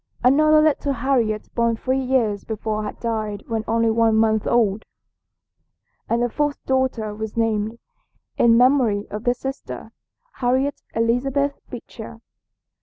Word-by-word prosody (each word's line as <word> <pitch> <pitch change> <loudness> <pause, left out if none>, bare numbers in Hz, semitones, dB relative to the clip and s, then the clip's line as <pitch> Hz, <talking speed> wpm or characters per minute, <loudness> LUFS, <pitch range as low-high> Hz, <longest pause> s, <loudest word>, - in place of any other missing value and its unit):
Another 305 +4 +5
little 290 -2 +1
Harriet 235 -4 -1
born 235 -1 +1
three 260 +3 -1
years 245 -6 0
before 215 -1 -3
had 210 - -6
died 215 -3 -3
when 225 -1 -2
only 230 0 +2
one 225 0 +3
month 220 -1 +2
old, 220 -3 +2 1.3
and 235 +1 +1
the - - +2
fourth 295 +2 -1
daughter 260 -5 0
was 220 +1 -6
named, 220 0 0 0.6
in 230 -1 +4
memory 245 -5 +3
of 210 +2 -6
this 245 0 +1
sister, 270 +2 -7 0.5
Harriet 260 +3 0
Elizabeth 270 +5 0
Beecher. 230 -1 -9
230 Hz, 130 wpm, -22 LUFS, 220-260 Hz, 1.3 s, Another